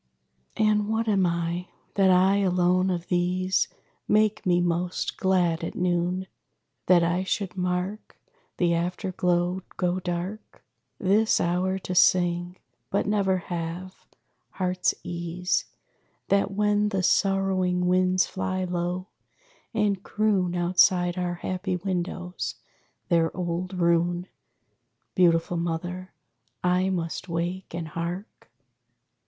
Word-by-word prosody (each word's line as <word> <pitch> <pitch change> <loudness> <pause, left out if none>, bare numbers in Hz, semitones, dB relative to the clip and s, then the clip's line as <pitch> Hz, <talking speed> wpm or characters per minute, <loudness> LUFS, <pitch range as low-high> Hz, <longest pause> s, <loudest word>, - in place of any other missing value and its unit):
And 210 -1 +2
what 225 +1 0
am 195 -4 +3
I? 170 +1 -2 0.3
That 195 -1 +4
I 185 +2 +5
alone 185 -1 +2
of 175 -2 -2
these 180 +1 +1 0.4
Make 215 -1 +2
me 175 -1 +4
most 175 +1 -1
glad 180 -3 +1
at - - -4
noon? 180 +1 0 0.6
That 175 -2 +6
I 175 +2 +1
should 190 -1 -2
mark 180 +3 -3 0.4
The 175 -1 +2
after 180 +3 -2
glow 180 +1 0 0.2
go 180 0 0
dark? 180 +4 -5 0.3
This 210 +4 +3
hour 180 +2 0
to 185 -1 -5
sing 175 0 +3 0.3
but 200 - 0
never 200 -2 +2 0.2
have 175 +3 -6 0.5
heart's 185 -1 0
ease! 175 +1 -2 0.6
That 200 0 +3
when 210 +1 +1
the 195 -3 -1
sorrowing 185 -2 +2
winds 185 0 +3
fly 185 0 -2
low, 180 0 -2 0.7
and 210 -4 +1
croon 200 -5 0
Outside 175 0 +3
our 180 -1 -2
happy 185 +1 -3
windows 180 0 -3 0.5
their 165 -2 +3
old 180 +1 -3
rune, 175 +1 +2 0.9
Beautiful 170 -1 +3
Mother, 175 +2 -3 0.5
I 180 +1 +2
must 175 0 -3
wake, 170 +2 -3
and 165 -2 -4
hark? 170 - -6
180 Hz, 115 wpm, -26 LUFS, 175-190 Hz, 0.9 s, That